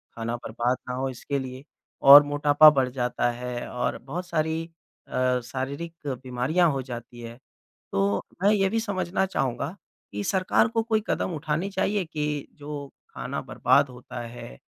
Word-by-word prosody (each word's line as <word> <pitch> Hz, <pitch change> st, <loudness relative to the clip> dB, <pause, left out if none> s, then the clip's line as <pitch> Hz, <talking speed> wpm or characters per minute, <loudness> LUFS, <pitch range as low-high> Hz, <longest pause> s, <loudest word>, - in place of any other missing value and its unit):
खाना 115 Hz, +1 st, -3 dB
बर्बाद 120 Hz, +2 st, -1 dB
ना 125 Hz, -, -2 dB
हो 135 Hz, +1 st, -1 dB
इसके 140 Hz, +2 st, -3 dB
लिए 130 Hz, 0 st, -7 dB, 0.5 s
और 145 Hz, +1 st, +12 dB
मोटापा 145 Hz, +1 st, +6 dB
बढ़ 135 Hz, -3 st, +1 dB
जाता 125 Hz, -1 st, 0 dB
है 120 Hz, 0 st, -5 dB
और 125 Hz, 0 st, -2 dB
बहुत 170 Hz, +8 st, -6 dB
सारी 160 Hz, -1 st, -1 dB, 0.4 s
अ, 125 Hz, 0 st, +1 dB
शारीरिक 140 Hz, +7 st, -5 dB
बीमरियाँ 130 Hz, +6 st, +1 dB
हो 135 Hz, -1 st, -2 dB
जाती 120 Hz, -1 st, -8 dB
हैं। 115 Hz, 0 st, -9 dB, 0.5 s
तो 100 Hz, +1 st, +1 dB, 0.2 s
मैं 205 Hz, -, +6 dB
ये 195 Hz, -2 st, +3 dB
भी 225 Hz, -, 0 dB
समझना 190 Hz, -3 st, -1 dB
चाहूँगा 140 Hz, -1 st, -2 dB, 0.4 s
कि 105 Hz, 0 st, -4 dB
सरकार 185 Hz, -, +2 dB
को 225 Hz, 0 st, 0 dB
कोई 220 Hz, -1 st, +1 dB
कदम 180 Hz, -, -1 dB
उठाने 155 Hz, +5 st, -2 dB
चाहिए 195 Hz, +1 st, 0 dB
कि 150 Hz, -2 st, -3 dB
जो 145 Hz, -1 st, -6 dB, 0.3 s
खाना -, -, -4 dB
बर्बाद 140 Hz, -1 st, +2 dB
होता 125 Hz, 0 st, -9 dB
है 115 Hz, -, -9 dB
140 Hz, 160 wpm, -26 LUFS, 125-165 Hz, 0.5 s, और